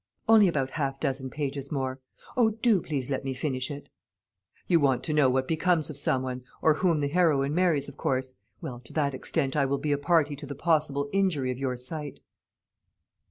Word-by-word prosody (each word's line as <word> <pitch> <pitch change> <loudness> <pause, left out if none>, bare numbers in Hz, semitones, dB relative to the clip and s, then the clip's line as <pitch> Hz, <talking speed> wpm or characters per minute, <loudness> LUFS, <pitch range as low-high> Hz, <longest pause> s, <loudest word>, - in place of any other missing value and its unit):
"Only 220 -3 +7
about 135 -6 -1
half 135 -3 -2
dozen 135 -2 -2
pages 140 -1 -4
more; 130 -2 -2 0.4
O, 235 -3 +4
do 220 -3 +2
please 140 -4 -3
let 135 - -1
me 135 -1 -3
finish 130 -1 -2
it!" 145 -1 -7 0.8
"You 170 - +4
want 135 -4 +2
to 155 - 0
know 150 -3 +4
what 130 +1 0
becomes 160 -1 +1
of 145 - -8
some 130 -2 +1
one, 130 -1 -5 0.2
or 160 - +4
whom 165 -1 +1
the 145 - +1
heroine 145 -3 +2
marries, 170 -5 +2
of - - -11
course. 130 0 -1 0.3
Well, 120 -2 -6
to - - -13
that 145 -3 0
extent 135 +1 -1
I 140 -2 +2
will 140 +1 0
be 150 +1 -2
a 145 - +1
party 150 -1 +2
to 145 - -6
the 140 - -6
possible 145 -2 +1
injury 175 -10 +1
of 125 - -6
your 130 -2 -2
sight." 145 +3 -4
145 Hz, 205 wpm, -27 LUFS, 135-160 Hz, 0.8 s, Only